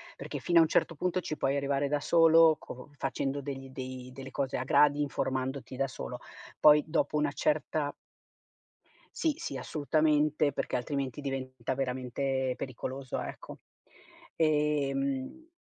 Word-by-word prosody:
perché - - -6
fino 175 -1 +4
a - - +9
un 160 - +4
certo 165 - +1
punto 180 +3 0
ci 155 -3 -4
puoi 135 0 0
arrivare 140 0 0
da 145 0 +1
solo, 165 0 +6
co 125 +3 -10
facendo 140 +2 -2
degli 135 -1 -6
dei 130 -1 -7
delle 135 0 -9
cose 135 0 -2
a 125 - -2
gradi, 145 +2 +4
informandoti 130 -2 -2
da 135 +1 0
solo, 125 -1 -7 0.4
poi, 150 0 +7
dopo 150 0 0
una 150 -1 +1
certa 150 0 0 1.2
Sì, 315 -4 +1
sì, 135 - -5
assolutamente, 150 +1 +1
perché - - -2
altrimenti 135 +1 -2
diventa 130 -2 -4
veramente 130 0 -1
pericoloso, 130 +1 -5
ecco. - - -8 0.8
Ehm, 150 - 0
140 Hz, 140 wpm, -30 LUFS, 130-150 Hz, 1.2 s, a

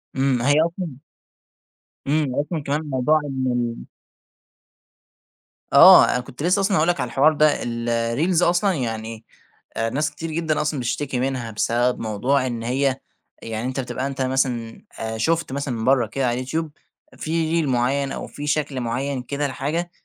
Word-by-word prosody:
إمم، 135 -2 +1
هي 145 +3 +3
أصلًا 170 -2 -4 1.1
إمم، 145 -3 +1
أصلًا 150 +1 -2
كمان 145 +2 -1
موضوع 140 +4 +2
ان 125 -4 -2 1.9
آه، - - +9
أنا - - 0
كنت 125 +3 -8
لسه 180 +4 +3
أصلًا 195 -1 +2
هاقول 155 - +2
لك 175 - 0
على - - -1
الحوار 150 +4 +3
ده، 150 0 +2
ال 115 0 -3
الreels 120 +10 +1
أصلًا 175 +3 +3
يعني 115 -5 -4 0.5
آآ، 115 0 0
ناس 150 +6 -1
كتير 165 0 -6
جدًا 160 -1 0
أصلًا 150 -1 -1
بتشتكي 125 +2 -2
منها، 125 -3 -2
بسبب 120 +3 0
موضوع 125 +5 0
إن 115 -2 -4
هي 130 +2 0 0.4
يعني 115 +2 -4
أنت 130 +1 -3
بتبقى 130 +1 -3
أنت 135 -1 -5
مثلًا، 130 -3 -1 0.2
آآ، 110 0 -4
شُفت 165 +7 0
مثلًا 130 -5 -3
برّه 130 -3 +3
كده 130 +5 -2
على 120 - +1
اليوتيوب 150 +6 -3 0.5
في 165 +1 0
reel - - -2
معيّن، 135 +2 0
أو - - -5
في 145 0 -7
شكل 145 -3 -1
معيّن 130 +3 -2
كده، 140 +3 -2
لحاجة 155 +7 -3
135 Hz, 160 wpm, -22 LUFS, 120-155 Hz, 1.9 s, آه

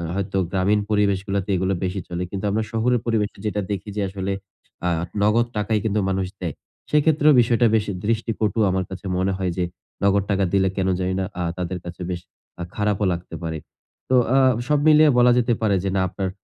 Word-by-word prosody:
হয়তো 95 0 -2
গ্রামীণ 100 +2 +2
পরিবেশগুলাতে 100 -1 0
এইগুলা 95 +1 0
বেশি 95 +2 -2
চলে। 90 +1 -3
কিন্তু 100 +1 -4
আমরা 110 +2 0
শহরের 120 +2 +1
পরিবেশে 110 -4 0
যেটা 105 -1 -1
দেখি 100 +1 -4
যে 105 - -1
আসলে 95 0 -3 0.6
আ - - +3 0.3
নগদ 115 +3 +3
টাকাই 105 +1 +1
কিন্তু 105 0 +1
মানুষ 95 -1 -1
দেয়। 85 -4 -3 0.4
সেক্ষেত্রেও 150 0 +4
বিষয়টা 120 0 +3
বেশ 110 -1 +1 0.2
দৃষ্টিকটু 110 -1 0
আমার 95 0 0
কাছে 95 0 -8
মনে 95 +1 +1
হয় 95 -2 -1
যে, 90 - +1 0.4
নগদ 100 0 +3
টাকা 100 0 +2
দিলে 95 -1 +3
কেন 95 -1 +1
জানিনা 95 +1 -1 0.2
আ - - 0
তাদের 90 0 -3
কাছে 85 +1 -8
বেশ 90 - -2 0.4
আ - - -1
খারাপও 105 -1 0
লাগতে 85 +1 -7
পারে। 80 -1 -3 0.5
তো 130 - +4 0.2
আ - - +5 0.3
সব 150 0 +3
মিলিয়ে 155 0 +7
বলা 125 0 +6
যেতে 120 0 +2
পারে 105 -3 +2
যে, 95 - 0
না, 95 - +2
আপনার 95 0 -3
100 Hz, 190 wpm, -22 LUFS, 95-110 Hz, 0.6 s, মিলিয়ে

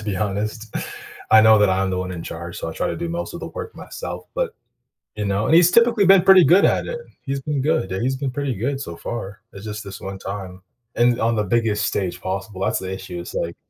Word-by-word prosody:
to - - -9
be 105 -2 -2
honest. 105 +3 -3 0.6
I 110 - +8
know 110 0 +7
that 105 -1 +4
I'm 95 +1 +1
the 90 - -1
one 90 0 -3
in 85 -2 -5
charge, 85 +1 -7
so - - -4
I - - -5
try - - -2
to - - -2
do 170 - -3
most 170 +1 -4
of - - -6
the - - -5
work 455 -2 -7
myself, - - -7
but, - - -1 0.6
you 105 - -2
know 100 +1 0
and 160 - +3
he's 175 +1 +6
typically 235 -4 +5
been 195 -1 +7
pretty 190 -1 +7
good 185 +5 +6
at - - +2
it, 485 -1 -4 0.2
he's 135 0 -3
been 145 0 -2
good 155 -7 0
yeah, 95 - -2
he's 130 +2 0
been 135 0 -2
pretty 140 0 -2
good 135 +7 -2
so 85 -11 -6
far. 105 0 -6
It's 100 - -10
just 105 0 -5
this 100 -1 -9
one 95 0 -6
time. 95 -2 -7 0.3
And 120 0 +3
on 115 +1 +2
the 105 - +1
biggest 105 -1 +1
stage 90 -3 -2
possible 95 +1 -4
that's 95 - +1
the 95 0 -5
issue, 95 -2 -6
it's 85 - -8
like, 85 0 -3
110 Hz, 255 wpm, -22 LUFS, 95-145 Hz, 0.6 s, I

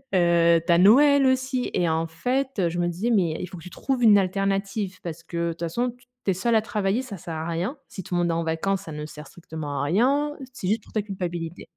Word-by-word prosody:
Heu, 170 -1 +4
tu 175 - +2
as - - +5
Noël 275 +8 +6
aussi 260 -1 0
et 175 -2 +1
en 160 +1 0
fait, 245 +2 -1
je 175 +1 -3
me 175 - +1
dis: 195 +8 -1
«Mais 175 -7 +2
il 180 - -4
faut 185 0 -10
que 165 - -11
tu 180 - -9
trouves 255 +6 -2
une 210 -2 +8
alternative 195 0 -1
parce 170 -1 -6
que 170 0 -3
de - - 0
toute 165 - -11
façon, 235 +10 -1
t 245 +1 -23 0.2
tu 195 - +3
es - - +2
seule 225 +6 +1
à 220 - +5
travailler, 210 +2 -1
ça 220 -7 -8
sert 170 -1 -7
à 160 +1 -4
rien. 180 - -2
Si 190 - -7
tout 180 - -7
le 175 - +2
monde 170 -1 +1
est - - +1
en 165 0 -1
vacances, 180 +4 -1
ça 160 - -8
ne 150 0 -5
sert 150 -1 -10
strictement 155 -3 -6
à - - 0
rien. 270 - +2 0.2
C'est 185 - -5
juste 215 0 0
pour - - -19
ta 215 - +1
culpabilité.» 175 -4 -5
185 Hz, 265 wpm, -25 LUFS, 170-225 Hz, 0.2 s, une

